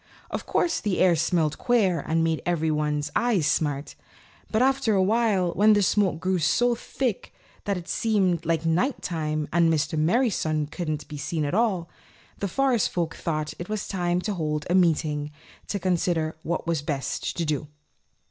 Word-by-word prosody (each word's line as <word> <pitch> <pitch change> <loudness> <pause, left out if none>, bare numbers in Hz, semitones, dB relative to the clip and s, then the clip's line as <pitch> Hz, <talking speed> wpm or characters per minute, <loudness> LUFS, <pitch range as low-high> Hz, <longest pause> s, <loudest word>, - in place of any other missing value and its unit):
Of - - -4
course 340 - +1
the 205 -4 -1
air 180 -2 +4
smelled 160 -2 0
queer 205 -9 +2
and 165 +3 0
made 160 -1 0 0.3
one's 150 -1 -1
eyes 225 -10 +2
smart. 145 -2 0 0.6
But 220 +3 +2
after 265 -5 +2
a 190 - +3
while 205 -4 +2
when 215 +4 +5
the 205 -1 +3
smoke 185 -4 +2
grew 185 +1 0
so 240 +10 +2
thick 235 -1 -3 0.3
that 200 -2 0
it 175 0 -8
seemed 190 -7 +1
like 165 -1 0
night 180 - +1
time 155 -3 -2
and 170 -1 +4
Mr. 155 0 0
Merry 230 +10 +3
Sun 155 -4 -1
couldn't 155 -4 -4
be 150 - -7
seen 150 +2 -2
at 145 - -2
all, 195 -6 +1 0.5
the 200 - -1
Forest 260 +2 +1
Folk 170 -2 -2
thought 155 -2 -3
it 175 - -5 0.2
time 175 -2 0
to 210 +2 -2
hold 150 -4 -2
a 175 - 0
meeting 155 -5 +2 0.4
to 205 - -2
consider 175 -3 0
what 170 +2 -3
was 165 -3 0
best 145 -2 -3
to 170 - 0
do. 150 -1 -2
170 Hz, 175 wpm, -25 LUFS, 155-200 Hz, 0.6 s, when